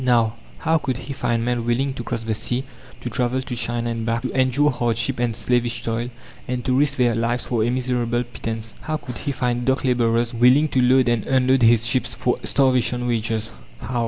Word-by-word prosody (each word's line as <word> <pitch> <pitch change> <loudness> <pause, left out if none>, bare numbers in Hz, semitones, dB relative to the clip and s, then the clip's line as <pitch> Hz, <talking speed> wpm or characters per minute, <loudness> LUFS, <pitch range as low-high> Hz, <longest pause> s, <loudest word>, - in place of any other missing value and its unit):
Now, 120 -3 +3 0.2
how 160 0 +1
could 130 -4 -2
he 135 +2 -6
find 120 -3 -1
men 120 -1 0
willing 130 +4 0
to 120 - -6
cross 115 -1 -4
the 110 -1 -1
sea, 120 +4 -2 0.4
to 125 - -4
travel 125 +1 0
to 125 - -5
China 120 0 -2
and 115 -1 -3
back, 115 +1 -1
to 130 - -2
endure 135 +3 +3
hardship 115 -2 -1
and 120 -2 0
slavish 120 0 0
toil 115 +1 -2 0.4
and 125 -1 -3
to 130 - +2
risk 140 +1 +2
their 120 -2 +3
lives 115 +2 -1
for 115 -3 0
a 115 - +1
miserable 125 -1 0
pittance? 115 -2 -6
How 155 0 -2
could 125 -5 -8
he 145 - -2
find 125 -2 -1
dock 130 +1 +1
labourers 120 -2 +1
willing 125 +6 +4
to 130 - +1
load 130 +1 +4
and 120 -3 +1
unload 130 0 +3
his 115 -1 +5
ships 120 0 0
for 125 +1 0
"starvation 125 -2 +2
wages"? 115 -2 -1 0.3
How? 120 0 -3
120 Hz, 210 wpm, -22 LUFS, 115-130 Hz, 0.4 s, his